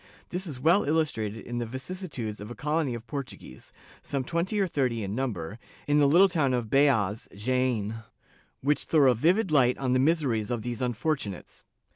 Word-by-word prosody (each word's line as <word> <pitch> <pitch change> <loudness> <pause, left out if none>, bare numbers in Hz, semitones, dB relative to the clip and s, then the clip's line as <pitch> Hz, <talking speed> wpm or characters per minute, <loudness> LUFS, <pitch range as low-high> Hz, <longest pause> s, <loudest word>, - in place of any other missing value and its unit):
This 180 +2 -3
is 140 -6 -6
well 170 +9 +4
illustrated 115 -9 -1
in 120 0 -4
the 120 - -2
vicissitudes 130 - -5
of 105 - -7
a 120 - -7
colony 150 -4 -1
of 115 -1 -8
Portuguese, 135 - -8 0.3
some 140 -2 -2
twenty 170 +8 -1
or 195 - +3
thirty 130 - -1
in 100 0 -4
number, 105 -6 -3 0.3
in 145 0 +3
the 145 - +5
little 175 +7 +6
town 155 -8 +1
of 115 -3 -3
Beas 115 -7 +2
(Jaen), 115 -1 0 0.6
which 145 +2 +1
throw 145 -5 +5
a - - +3
vivid 175 - +2
light 125 -4 +4
on 130 -2 0
the 130 - +3
miseries 130 -7 +1
of 120 -3 -2
these 120 -1 -4
unfortunates. 125 - -3
130 Hz, 180 wpm, -27 LUFS, 115-155 Hz, 0.6 s, little